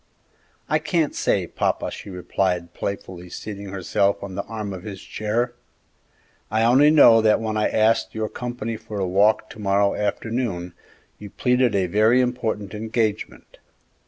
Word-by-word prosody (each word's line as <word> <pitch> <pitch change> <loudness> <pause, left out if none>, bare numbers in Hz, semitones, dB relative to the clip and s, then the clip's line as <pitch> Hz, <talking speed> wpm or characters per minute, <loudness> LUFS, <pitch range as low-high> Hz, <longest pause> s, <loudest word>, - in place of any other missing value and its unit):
"I - - +2
can't 165 -5 0
say, - - 0
papa," - - -2
she - - -9
replied, 90 -1 -2
playfully 95 -3 -6
seating 100 +2 -7
herself 100 +1 0
on 100 -1 -6
the 100 - -2
arm 105 -3 -5
of 95 - -7
his 100 -2 -8
chair; 115 +3 -2 1.0
"I 110 +1 +1
only 130 +6 +6
know 120 -7 +7
that 110 0 +4
when 110 -1 -3
I 105 - +1
asked 110 -5 +2
your 110 0 -1
company 120 -1 -5
for 105 -1 -7
a 95 - 0
walk 105 +4 +3
to - - -12
morrow 100 0 +2
afternoon, 105 -4 -2 0.5
you 105 - -9
pleaded 125 0 +1
a 95 -2 +2
very 110 +7 +3
important 115 -5 -1
engagement. 110 0 -3
105 Hz, 155 wpm, -23 LUFS, 100-115 Hz, 1.0 s, know